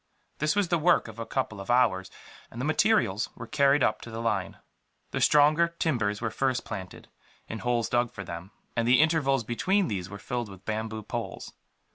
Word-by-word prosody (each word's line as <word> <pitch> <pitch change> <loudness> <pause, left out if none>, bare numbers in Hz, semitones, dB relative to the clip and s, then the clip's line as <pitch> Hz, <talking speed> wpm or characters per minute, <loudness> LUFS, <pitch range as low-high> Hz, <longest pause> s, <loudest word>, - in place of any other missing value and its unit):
This 150 +3 +1
was 205 -4 +1
the 170 -2 +2
work 175 -3 +3
of 110 0 -10
a 115 - -5
couple 110 -2 -2
of 100 - -10
hours, 110 -7 +3 0.4
and 115 - -9
the 130 - -2
materials 155 - +2
were 115 - -7
carried 140 +2 +3
up 110 - +1
to - - -9
the 110 0 -6
line. 115 0 -1 0.5
The - - -2
stronger 150 +3 +5
timbers 110 -11 0
were 110 -2 -1
first 130 +1 0
planted, 95 -4 -7 0.4
in 110 - -5
holes 120 -1 0
dug 120 -1 +1
for 100 - -7
them; 85 +1 -7 0.3
and 115 -1 +1
the 125 +1 +6
intervals 145 -5 +3
between 185 - +1
these 95 -4 -3
were 100 - -7
filled 120 +1 -4
with 95 -1 -13
bamboo 110 0 -3
poles. - - -5
120 Hz, 195 wpm, -28 LUFS, 105-145 Hz, 0.5 s, the